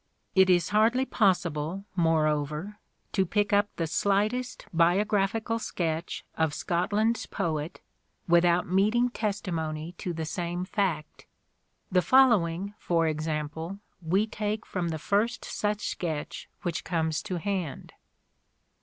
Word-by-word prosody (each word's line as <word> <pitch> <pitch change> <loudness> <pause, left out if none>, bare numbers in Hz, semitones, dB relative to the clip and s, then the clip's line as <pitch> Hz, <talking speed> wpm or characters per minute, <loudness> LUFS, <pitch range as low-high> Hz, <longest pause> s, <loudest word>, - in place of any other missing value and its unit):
It 190 0 +5
is 175 -2 +3
hardly 225 +5 +3
possible, 180 - 0
more 165 -3 +3
over, 150 +7 -2 0.3
to 190 - +2
pick 205 +3 0
up 205 0 +4
the 165 - -1
slightest 210 +9 0
biographical 200 +6 +2
sketch 165 -5 -3
of 160 -2 0
Scotland's 210 +6 0
poet 155 -1 -3 0.5
without 175 0 +4
meeting 215 +7 +3
testimony 170 -8 -3
to 180 - -3
the 165 -1 -3
same 175 +2 -3
fact. 185 -6 -2 0.6
The 180 -1 +4
following, 200 -6 +4
for 165 -1 +1
example, 155 +3 -3 0.2
we 185 +6 +2
take 215 0 -3
from 180 -2 -2
the 160 -1 -2
first 220 +9 0
such 210 0 -2
sketch 160 -4 -4
which 175 -4 -2
comes 160 -3 -1
to 190 -4 -4
hand. 185 -5 -3
180 Hz, 120 wpm, -28 LUFS, 160-205 Hz, 0.6 s, It